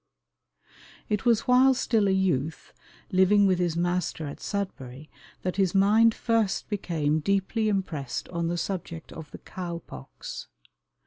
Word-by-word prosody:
It 210 Hz, +2 st, -1 dB
was 230 Hz, -2 st, +4 dB
while 255 Hz, +1 st, +5 dB
still 220 Hz, -4 st, +1 dB
a -, -, +3 dB
youth, 170 Hz, -6 st, -1 dB, 0.4 s
living 190 Hz, +2 st, +5 dB
with 185 Hz, -2 st, +2 dB
his 175 Hz, -2 st, 0 dB
master 175 Hz, -2 st, -1 dB
at 140 Hz, -, -7 dB
Sudbury, 155 Hz, -, -5 dB, 0.3 s
that 185 Hz, +1 st, -2 dB
his 190 Hz, -2 st, +1 dB
mind 215 Hz, +3 st, +5 dB
first 225 Hz, -4 st, 0 dB
became 160 Hz, -7 st, 0 dB
deeply 200 Hz, +6 st, 0 dB
impressed 165 Hz, -10 st, -3 dB
on 170 Hz, -1 st, -2 dB
the 175 Hz, +1 st, -1 dB
subject 170 Hz, -2 st, -5 dB
of 160 Hz, -2 st, -9 dB
the -, -, -10 dB
cow 175 Hz, -2 st, -6 dB
pox. 65 Hz, -, -9 dB
185 Hz, 140 wpm, -27 LUFS, 165-205 Hz, 0.4 s, while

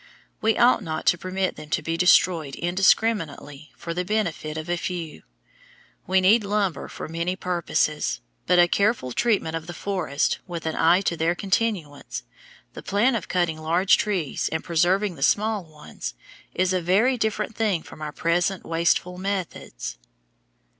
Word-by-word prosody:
We 220 Hz, 0 st, +2 dB
ought 245 Hz, -1 st, +5 dB
not 160 Hz, -4 st, -4 dB
to 175 Hz, -, +4 dB
permit 185 Hz, +1 st, -2 dB
them 155 Hz, -1 st, -10 dB
to 135 Hz, -, -1 dB
be 165 Hz, -, -1 dB
destroyed 170 Hz, -4 st, +3 dB
indiscriminately 175 Hz, -5 st, 0 dB
for 170 Hz, -, -5 dB
the 180 Hz, +1 st, -1 dB
benefit 175 Hz, -6 st, -2 dB
of 155 Hz, +1 st, -5 dB
a 175 Hz, -, 0 dB
few. 170 Hz, -, -5 dB, 0.9 s
We 190 Hz, +1 st, +4 dB
need 210 Hz, +4 st, +5 dB
lumber 200 Hz, -3 st, -1 dB
for -, -, -7 dB
many 170 Hz, +3 st, -2 dB
purposes; 170 Hz, -4 st, -1 dB, 0.3 s
but 180 Hz, -, +4 dB
a 175 Hz, 0 st, +6 dB
careful 200 Hz, -, +1 dB
treatment 200 Hz, -, +1 dB
of 165 Hz, 0 st, -5 dB
the 175 Hz, -, -7 dB
forests 180 Hz, -8 st, -1 dB
with 170 Hz, -2 st, -6 dB
an 160 Hz, -, -1 dB
eye 170 Hz, +3 st, +4 dB
to 175 Hz, -, -1 dB
their 165 Hz, +1 st, +1 dB
continuance, 180 Hz, -, -2 dB, 0.5 s
the -, -, -8 dB
plan 220 Hz, +6 st, +2 dB
of 225 Hz, -6 st, -3 dB
cutting 175 Hz, -3 st, 0 dB
large 170 Hz, +5 st, +3 dB
trees, 185 Hz, -9 st, -1 dB
and 160 Hz, -, -2 dB
preserving 180 Hz, +2 st, +1 dB
the -, -, -11 dB
small 210 Hz, +5 st, +2 dB
ones, 150 Hz, -, -8 dB, 0.4 s
is 185 Hz, 0 st, +1 dB
a 185 Hz, -, +1 dB
very 205 Hz, +10 st, +3 dB
different 220 Hz, -2 st, -2 dB
thing 205 Hz, -7 st, 0 dB
from -, -, -13 dB
our 150 Hz, -1 st, -4 dB
present 175 Hz, +4 st, 0 dB
wasteful 170 Hz, +2 st, 0 dB
methods. 185 Hz, -, -4 dB
175 Hz, 160 wpm, -24 LUFS, 160-200 Hz, 0.9 s, a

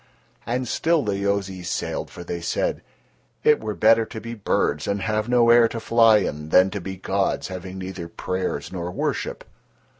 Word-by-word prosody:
And 125 Hz, +2 st, -1 dB
still 160 Hz, +4 st, +1 dB
the 100 Hz, -3 st, -1 dB
Yozis 100 Hz, -2 st, -2 dB
sailed, -, -, -3 dB
for 85 Hz, -, -9 dB
they 85 Hz, 0 st, -5 dB
said: 85 Hz, -, -1 dB, 0.6 s
"It 150 Hz, -, +5 dB
were 105 Hz, -1 st, -3 dB
better 115 Hz, +1 st, +5 dB
to 110 Hz, -, -7 dB
be 115 Hz, +1 st, -7 dB
birds 95 Hz, -8 st, 0 dB
and 100 Hz, 0 st, -1 dB
have 110 Hz, +1 st, -1 dB
no 120 Hz, -1 st, +5 dB
air 120 Hz, -1 st, +7 dB
to 115 Hz, -, -5 dB
fly 115 Hz, -1 st, +5 dB
in, 75 Hz, -6 st, -3 dB
than 95 Hz, +3 st, +5 dB
to 100 Hz, -, -4 dB
be 95 Hz, +2 st, -5 dB
gods 95 Hz, +1 st, -1 dB
having 95 Hz, 0 st, -7 dB
neither 95 Hz, -2 st, -6 dB
prayers 90 Hz, +2 st, -3 dB
nor 90 Hz, -2 st, -4 dB
worship." 90 Hz, -, -3 dB
100 Hz, 180 wpm, -23 LUFS, 95-115 Hz, 0.6 s, air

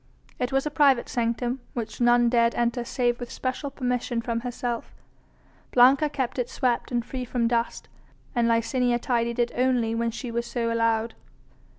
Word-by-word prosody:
It 250 Hz, +1 st, -1 dB
was 270 Hz, +1 st, +1 dB
a 300 Hz, -, -2 dB
private 280 Hz, -5 st, +4 dB
sanctum 240 Hz, +2 st, -1 dB, 0.2 s
which 225 Hz, -1 st, -5 dB
none 240 Hz, 0 st, +5 dB
dared 235 Hz, -1 st, +3 dB
enter 240 Hz, 0 st, 0 dB
save 240 Hz, -1 st, 0 dB
with 245 Hz, -1 st, -6 dB
special 270 Hz, +2 st, -3 dB
permission 250 Hz, -3 st, -2 dB
from 230 Hz, 0 st, -2 dB
herself. 240 Hz, -1 st, -4 dB, 0.8 s
Blanca 265 Hz, +5 st, +5 dB
kept 260 Hz, -3 st, -3 dB
it 245 Hz, -, -1 dB
swept 245 Hz, -1 st, -1 dB
and 240 Hz, -1 st, -1 dB
free 255 Hz, 0 st, -5 dB
from 240 Hz, -1 st, 0 dB
dust, 235 Hz, 0 st, -1 dB, 0.5 s
and 240 Hz, -3 st, +2 dB
Licinia 240 Hz, +1 st, +2 dB
tidied 235 Hz, -1 st, -1 dB
it 240 Hz, -1 st, +1 dB
only 245 Hz, -3 st, +1 dB
when 230 Hz, 0 st, 0 dB
she 235 Hz, +1 st, -6 dB
was 235 Hz, +1 st, -2 dB
so 230 Hz, -1 st, -1 dB
allowed. 230 Hz, 0 st, +1 dB
240 Hz, 170 wpm, -26 LUFS, 235-250 Hz, 0.8 s, none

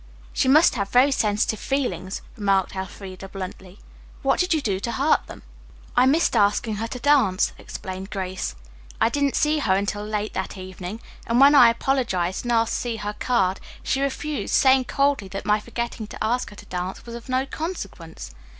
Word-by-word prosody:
"She -, -, +1 dB
must 305 Hz, +5 st, +6 dB
have 200 Hz, -5 st, -2 dB
very 255 Hz, +5 st, +5 dB
sensitive 215 Hz, -3 st, +1 dB
feelings," 195 Hz, -9 st, -2 dB
remarked 195 Hz, -4 st, +1 dB
Elfreda 190 Hz, 0 st, -7 dB
bluntly. 190 Hz, 0 st, -8 dB, 0.5 s
"What -, -, +2 dB
did 360 Hz, 0 st, +1 dB
you 320 Hz, -, +3 dB
do 200 Hz, -9 st, -1 dB
to 235 Hz, +4 st, -3 dB
hurt 280 Hz, +4 st, +2 dB
them?" -, -, -11 dB, 0.5 s
"I 250 Hz, +1 st, +5 dB
missed 300 Hz, 0 st, +3 dB
asking 210 Hz, 0 st, +2 dB
her 225 Hz, +2 st, -2 dB
to 250 Hz, -, -6 dB
dance," 250 Hz, -9 st, +3 dB
explained 190 Hz, +1 st, -7 dB
Grace. 190 Hz, -1 st, -4 dB, 0.4 s
"I -, -, +4 dB
didn't 280 Hz, +1 st, 0 dB
see 305 Hz, 0 st, +2 dB
her 190 Hz, -10 st, +2 dB
until 205 Hz, +1 st, -1 dB
late 210 Hz, 0 st, -3 dB
that 190 Hz, +1 st, -4 dB
evening, 185 Hz, +3 st, -7 dB, 0.3 s
and 235 Hz, +1 st, +2 dB
when 280 Hz, +2 st, +8 dB
I 250 Hz, -5 st, +8 dB
apologized 230 Hz, -7 st, -1 dB
and 240 Hz, -, -1 dB
asked 230 Hz, -1 st, +2 dB
to -, -, -1 dB
see 240 Hz, -2 st, -3 dB
her 210 Hz, -1 st, -4 dB
card 195 Hz, -7 st, +1 dB, 0.2 s
she 270 Hz, -, 0 dB
refused, 280 Hz, +2 st, -2 dB
saying 260 Hz, -1 st, +5 dB
coldly 275 Hz, -6 st, +1 dB
that 195 Hz, +1 st, -6 dB
my 210 Hz, 0 st, +3 dB
forgetting 235 Hz, 0 st, -5 dB
to -, -, -6 dB
ask 245 Hz, +3 st, 0 dB
her 205 Hz, -, -13 dB
to -, -, -12 dB
dance 180 Hz, +1 st, -5 dB
was 235 Hz, -, -8 dB
of 235 Hz, +2 st, -9 dB
no 255 Hz, +1 st, +1 dB
consequence. 200 Hz, -, -6 dB
220 Hz, 185 wpm, -24 LUFS, 195-265 Hz, 0.5 s, when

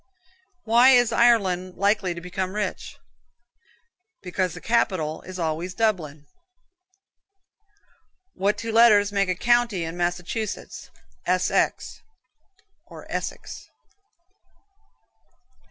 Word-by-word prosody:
Why 235 Hz, +3 st, +5 dB
is 245 Hz, -2 st, +4 dB
Ireland 190 Hz, -6 st, +2 dB
likely 200 Hz, -2 st, 0 dB
to 170 Hz, -, -8 dB
become 185 Hz, +2 st, -4 dB
rich? 210 Hz, -1 st, -4 dB, 1.3 s
Because 180 Hz, -1 st, -2 dB
the -, -, -8 dB
capital 185 Hz, -8 st, -1 dB
is 185 Hz, 0 st, -9 dB
always 170 Hz, +2 st, -3 dB
Dublin 175 Hz, -10 st, -1 dB
(doubling). 145 Hz, -, -32 dB, 2.1 s
What 200 Hz, +2 st, 0 dB
two 225 Hz, +2 st, -5 dB
letters 215 Hz, -3 st, +5 dB
make 200 Hz, -2 st, 0 dB
a 185 Hz, -, 0 dB
county 240 Hz, -3 st, +1 dB
in 165 Hz, +1 st, -5 dB
Massachusetts? 175 Hz, +5 st, -4 dB, 0.4 s
S. -, -, +1 dB
X. -, -, -1 dB, 0.9 s
(Essex). -, -, -7 dB
190 Hz, 95 wpm, -24 LUFS, 175-225 Hz, 2.1 s, Why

